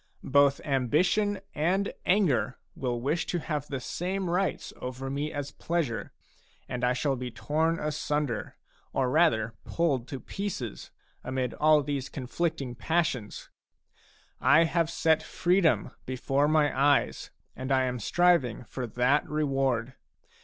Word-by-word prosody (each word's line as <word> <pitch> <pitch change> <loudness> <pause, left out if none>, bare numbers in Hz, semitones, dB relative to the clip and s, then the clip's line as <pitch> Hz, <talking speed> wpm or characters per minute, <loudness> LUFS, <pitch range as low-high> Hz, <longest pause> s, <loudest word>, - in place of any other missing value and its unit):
Both 140 0 +4
ambition 175 - +1
and 185 +6 0
anger 180 - +2 0.2
will 125 -3 -2
wish 150 +7 -1
to 180 - -1
have 150 -3 -3
the 135 - -3
same 180 +6 -3
rights 190 +2 -1
over 130 +1 -5
me 145 +2 -2
as 145 -1 -4
pleasure, 160 -9 -2 0.6
and 125 0 -4
I 125 0 +3
shall 135 +2 0
be 125 -1 -5
torn 160 +7 0
asunder, 150 -6 -2 0.4
or 130 -2 +1
rather 115 -8 +3
pulled 140 -8 0
to 135 - -5
pieces, 175 - -5 0.3
amid 130 -1 -2
all 155 -1 +4
these 140 -1 -3
conflicting 140 0 -3
passions. 130 -4 -2 0.9
I 145 +6 +6
have 165 0 +1
set 160 -1 +2
freedom 180 -1 +2 0.2
before 135 +3 +1
my 150 -2 +3
eyes; 140 +1 +2 0.3
and 130 +1 -5
I 130 -1 +4
am 125 -1 -2
striving 170 - +2
for 125 +1 -5
that 125 +5 +1
reward. 135 -5 0
145 Hz, 130 wpm, -28 LUFS, 130-165 Hz, 0.9 s, I